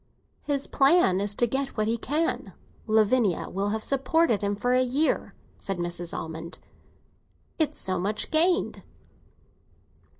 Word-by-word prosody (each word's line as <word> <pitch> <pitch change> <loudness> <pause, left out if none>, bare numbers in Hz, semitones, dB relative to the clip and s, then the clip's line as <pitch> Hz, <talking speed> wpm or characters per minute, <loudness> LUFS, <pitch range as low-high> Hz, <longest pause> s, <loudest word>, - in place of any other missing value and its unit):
"His 280 -2 -1
plan 275 - +4
is 205 0 -1
to 240 - +3
get 265 +3 -3
what 215 0 +1
he 225 - +1
can. 300 +8 -2 0.3
Lavinia 215 -2 +2
will 195 +2 -1
have 220 +1 -2
supported 275 -3 +2
him 205 0 0
for 245 +5 0
a 255 - +4
year," 265 +5 0 0.2
said 195 -3 -3
Mrs. 175 0 -3
Almond. 160 +1 -6 1.0
"It's 305 -2 +1
so 185 -1 -1
much 210 +4 -2
gained." 345 +4 +2
225 Hz, 135 wpm, -26 LUFS, 195-275 Hz, 1.0 s, plan